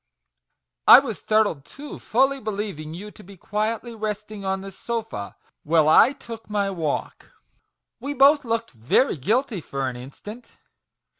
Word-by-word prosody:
I -, -, +12 dB
was 250 Hz, -6 st, -1 dB
startled 215 Hz, -10 st, +1 dB
too, 285 Hz, -, -10 dB
fully 270 Hz, +4 st, +1 dB
be 215 Hz, -, -4 dB
lieving 195 Hz, -7 st, -5 dB
you 205 Hz, +4 st, -8 dB
to 210 Hz, -, -15 dB
be 195 Hz, +1 st, -14 dB
quietly 220 Hz, +5 st, -3 dB
resting 210 Hz, -1 st, -5 dB
on 190 Hz, 0 st, -1 dB
the 195 Hz, 0 st, -8 dB
sofa, 210 Hz, -, -5 dB, 0.3 s
while 155 Hz, 0 st, +3 dB
I 160 Hz, +10 st, +7 dB
took 230 Hz, -5 st, -10 dB
my 200 Hz, -1 st, 0 dB
walk 160 Hz, -6 st, -3 dB, 0.2 s
!" -, -, -45 dB
" -, -, -61 dB
We 285 Hz, +1 st, -4 dB
both 285 Hz, +2 st, +6 dB
looked 230 Hz, -1 st, -2 dB
very 125 Hz, -, +1 dB
guilty 215 Hz, -, 0 dB
for 135 Hz, -2 st, -3 dB
an 125 Hz, -, -4 dB
instant." 205 Hz, -, -11 dB
210 Hz, 160 wpm, -24 LUFS, 170-235 Hz, 0.3 s, I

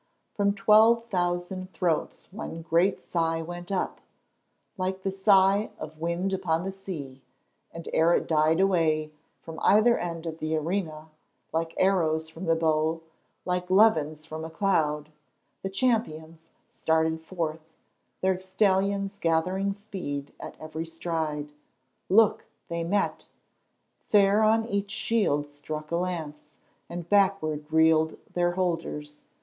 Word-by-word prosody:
From 200 Hz, -1 st, +1 dB
twelve 220 Hz, +3 st, +5 dB
thousand 185 Hz, -2 st, -2 dB
throats 175 Hz, +1 st, -2 dB
one 165 Hz, -5 st, -6 dB
great 170 Hz, +4 st, +2 dB
sigh 165 Hz, -1 st, -1 dB
went 175 Hz, +2 st, -7 dB
up, 190 Hz, -, -2 dB, 0.7 s
like 190 Hz, -1 st, -3 dB
the 195 Hz, -, 0 dB
sigh 195 Hz, +1 st, +4 dB
of 155 Hz, 0 st, -9 dB
wind 170 Hz, +4 st, -1 dB
upon 175 Hz, -3 st, 0 dB
the 195 Hz, -, -3 dB
sea, 155 Hz, -9 st, -8 dB, 0.5 s
and 165 Hz, 0 st, -9 dB
ere 165 Hz, +2 st, +4 dB
it -, -, -1 dB
died 160 Hz, +1 st, +3 dB
away, 160 Hz, -5 st, +2 dB, 0.3 s
from 160 Hz, -1 st, -9 dB
either 215 Hz, +4 st, +5 dB
end 170 Hz, -1 st, -4 dB
of 165 Hz, -1 st, -5 dB
the 155 Hz, 0 st, -1 dB
arena, 160 Hz, -2 st, -3 dB, 0.4 s
like 165 Hz, 0 st, -2 dB
arrows 160 Hz, -4 st, +2 dB
from 165 Hz, +3 st, -8 dB
the 165 Hz, -1 st, +3 dB
bow, 160 Hz, 0 st, +1 dB, 0.5 s
like 180 Hz, 0 st, -2 dB
levens 155 Hz, -7 st, +3 dB
from 160 Hz, 0 st, -6 dB
a 160 Hz, -, -5 dB
cloud, 155 Hz, -5 st, 0 dB, 0.5 s
the 195 Hz, -, -3 dB
champions 165 Hz, -8 st, -1 dB, 0.2 s
started 160 Hz, 0 st, 0 dB
forth, 160 Hz, -2 st, -4 dB, 0.5 s
their 190 Hz, -1 st, +1 dB
stallions 195 Hz, +1 st, 0 dB
gathering 185 Hz, +4 st, +1 dB
speed 180 Hz, -9 st, -6 dB
at -, -, -8 dB
every 155 Hz, +1 st, -5 dB
stride. 160 Hz, -3 st, -3 dB, 0.6 s
Look, 215 Hz, +2 st, +4 dB, 0.2 s
they 170 Hz, 0 st, -2 dB
met! 195 Hz, +4 st, -1 dB, 0.8 s
Fair 205 Hz, 0 st, +4 dB
on 220 Hz, +1 st, +3 dB
each 200 Hz, -2 st, -2 dB
shield 205 Hz, -9 st, 0 dB
struck 150 Hz, +2 st, -7 dB
a -, -, +1 dB
lance, 160 Hz, -5 st, -4 dB, 0.4 s
and 175 Hz, -1 st, -6 dB
backward 170 Hz, -7 st, +1 dB
reeled 160 Hz, 0 st, +3 dB, 0.2 s
their 175 Hz, 0 st, +1 dB
holders. 165 Hz, -5 st, -3 dB
170 Hz, 130 wpm, -27 LUFS, 160-195 Hz, 0.8 s, twelve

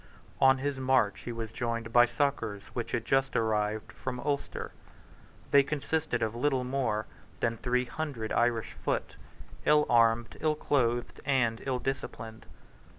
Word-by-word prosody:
On 130 Hz, 0 st, +6 dB
his 135 Hz, 0 st, -2 dB
march 130 Hz, -6 st, +2 dB
he 120 Hz, -, -3 dB
was 115 Hz, -2 st, -5 dB
joined 115 Hz, -1 st, -3 dB
by 120 Hz, 0 st, +7 dB
succours 120 Hz, -5 st, -1 dB
which 120 Hz, -2 st, -4 dB
had 115 Hz, -3 st, -1 dB
just 135 Hz, +2 st, +1 dB
arrived 110 Hz, -1 st, 0 dB
from 125 Hz, -1 st, -5 dB
Ulster. 140 Hz, +1 st, -3 dB, 0.8 s
They 140 Hz, -, +8 dB
consisted 150 Hz, -2 st, -1 dB
of 110 Hz, -1 st, -1 dB
little 130 Hz, +1 st, +1 dB
more 125 Hz, -5 st, -1 dB, 0.3 s
than 115 Hz, -1 st, +1 dB
three 125 Hz, +2 st, 0 dB
hundred 130 Hz, -5 st, -4 dB
Irish 120 Hz, -2 st, +1 dB
foot, -, -, -2 dB, 0.5 s
ill 150 Hz, 0 st, +5 dB
armed, 115 Hz, -1 st, +3 dB
ill 155 Hz, -1 st, +1 dB
clothed, 120 Hz, -5 st, 0 dB
and 120 Hz, -5 st, +1 dB
ill 130 Hz, -1 st, +1 dB
disciplined. 115 Hz, -4 st, -5 dB
120 Hz, 145 wpm, -30 LUFS, 115-135 Hz, 0.8 s, They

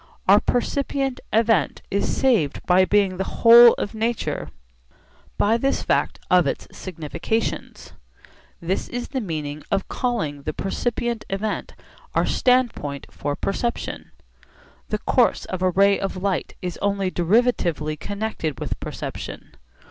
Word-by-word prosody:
Our -, -, +7 dB
percipient 270 Hz, +1 st, -1 dB
event 220 Hz, -8 st, +2 dB
is 200 Hz, -, 0 dB
saved 220 Hz, -, +1 dB
by 185 Hz, +1 st, +5 dB
being 195 Hz, -2 st, +2 dB
the 190 Hz, -, 0 dB, 0.2 s
whole 235 Hz, +1 st, +10 dB
of 205 Hz, -, -4 dB
nature 225 Hz, +1 st, -2 dB, 0.9 s
by 220 Hz, +3 st, +3 dB
this 270 Hz, +3 st, 0 dB
fact -, -, +1 dB
of 180 Hz, -4 st, +5 dB
its -, -, -3 dB
significations. 175 Hz, +5 st, -4 dB, 0.7 s
This 180 Hz, +3 st, -2 dB
is 245 Hz, 0 st, -4 dB
the 265 Hz, -2 st, -2 dB
meaning 155 Hz, -6 st, -4 dB
of 195 Hz, -1 st, 0 dB
calling 210 Hz, -, -2 dB
the 155 Hz, +2 st, -4 dB
percipient 235 Hz, +5 st, -2 dB
event 205 Hz, +2 st, -3 dB, 0.4 s
our -, -, +3 dB
standpoint 245 Hz, -, +1 dB
for 145 Hz, 0 st, -3 dB
perception. 235 Hz, +8 st, -3 dB, 0.8 s
The -, -, 0 dB
course -, -, +2 dB
of 185 Hz, -, -5 dB
a 185 Hz, -, +3 dB
ray 200 Hz, +2 st, +4 dB
of 195 Hz, -1 st, -3 dB
light 190 Hz, -1 st, -2 dB
is 180 Hz, -1 st, -4 dB
only 200 Hz, -2 st, 0 dB
derivatively 175 Hz, -6 st, +1 dB
connected 200 Hz, -8 st, -4 dB
with -, -, -4 dB
perception. -, -, -7 dB
200 Hz, 130 wpm, -23 LUFS, 175-235 Hz, 0.9 s, whole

